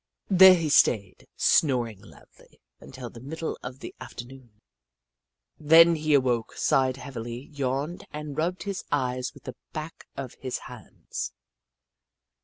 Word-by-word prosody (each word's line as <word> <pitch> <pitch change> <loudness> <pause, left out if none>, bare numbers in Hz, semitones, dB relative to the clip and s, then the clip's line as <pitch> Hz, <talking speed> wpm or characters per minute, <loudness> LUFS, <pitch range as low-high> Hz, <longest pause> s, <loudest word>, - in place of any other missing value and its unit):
There 190 0 +9
he 165 -3 -1
stayed, 105 -9 +2
snoring 120 - +2
loudly, - - -19 0.2
until 125 -2 -9
the 115 - -11
middle 160 +6 -5
of 125 +2 -8
the - - -8
after 130 -2 -8
noon. 120 -4 -16 1.0
Then 165 +2 +7
he 155 -1 +2
awoke, 125 -4 +1
sighed 130 -1 +2
heavily, 125 -1 -7
yawned, 140 +4 -3
and 150 -1 -7
rubbed 175 +4 -1
his 200 -2 -4
eyes 125 -3 -1
with - - -15
the 130 - -7 0.2
backs 155 +1 -7
of 135 -3 -6
his 130 -2 -3
hands. - - -7
135 Hz, 135 wpm, -26 LUFS, 125-155 Hz, 1.0 s, There